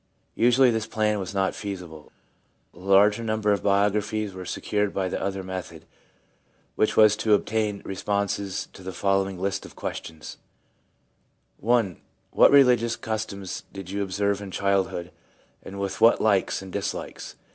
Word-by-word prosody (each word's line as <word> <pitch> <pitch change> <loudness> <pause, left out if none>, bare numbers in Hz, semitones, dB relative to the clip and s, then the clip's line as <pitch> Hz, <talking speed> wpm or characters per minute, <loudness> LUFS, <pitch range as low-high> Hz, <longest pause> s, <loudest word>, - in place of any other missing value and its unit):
Usually 125 +2 +4
this 110 -1 -2
plan 105 -1 0
was 95 +1 -6
not 95 0 +1
feasible. 90 -7 -8 0.6
The - - -17
larger 100 +4 +4
number 110 -1 0
of 100 - +1
bio 100 0 +3
graphies 105 0 -2
were 95 0 -8
secured 105 -1 -1
by 95 -1 0
the - - -3
other 95 0 -3
method, 95 -1 -7 0.9
which 110 - 0
was 110 -1 +7
to 110 -1 +3
obtain 105 -1 -1
responses 100 0 -2
to - - -13
the 95 0 -6
following 95 -1 0
list 95 +1 -2
of - - -13
questions: 80 -1 -7 0.4
— - - -43
* - - -35
I. 115 -5 +2 0.3
What - - +6
religious 125 -4 +5
customs 105 -3 -5
did 95 -2 -8
you 100 +1 -2
observe 100 +1 -1
in 100 - -7
child 100 -1 +1
hood, 85 +1 -6 0.5
and 100 +1 -9
with 100 -1 -4
what 115 - +6
likes 100 -2 +1
and 95 - -10
dislikes? 100 -1 -5
100 Hz, 160 wpm, -25 LUFS, 95-110 Hz, 0.9 s, was